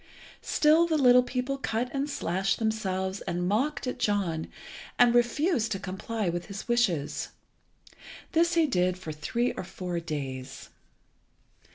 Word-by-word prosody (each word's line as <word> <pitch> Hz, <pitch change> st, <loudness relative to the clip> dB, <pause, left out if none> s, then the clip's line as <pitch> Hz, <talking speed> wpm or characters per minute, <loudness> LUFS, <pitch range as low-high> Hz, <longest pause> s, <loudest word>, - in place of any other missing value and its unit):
Still 320 Hz, +3 st, +4 dB
the 320 Hz, -2 st, +1 dB
little 250 Hz, -3 st, +7 dB
people 255 Hz, +2 st, -3 dB
cut 245 Hz, -1 st, -2 dB
and 280 Hz, +1 st, -1 dB
slashed 195 Hz, -6 st, -1 dB
themselves 195 Hz, -4 st, -2 dB
and 175 Hz, +1 st, -1 dB
mocked 265 Hz, +10 st, 0 dB
at 250 Hz, 0 st, -4 dB
John, 195 Hz, -8 st, 0 dB, 0.5 s
and 245 Hz, -1 st, +6 dB
refused 240 Hz, -, +2 dB
to 195 Hz, -, -4 dB
comply 195 Hz, +2 st, -4 dB
with 175 Hz, 0 st, -2 dB
his 200 Hz, -1 st, -7 dB
wishes. 200 Hz, -12 st, 0 dB, 1.0 s
This 340 Hz, +1 st, +3 dB
he 330 Hz, -1 st, +4 dB
did 180 Hz, -8 st, +1 dB
for 170 Hz, -4 st, -7 dB
three 235 Hz, +11 st, -1 dB
or -, -, -5 dB
four 180 Hz, -1 st, -4 dB
days. 135 Hz, -5 st, -6 dB
215 Hz, 140 wpm, -28 LUFS, 180-250 Hz, 1.0 s, little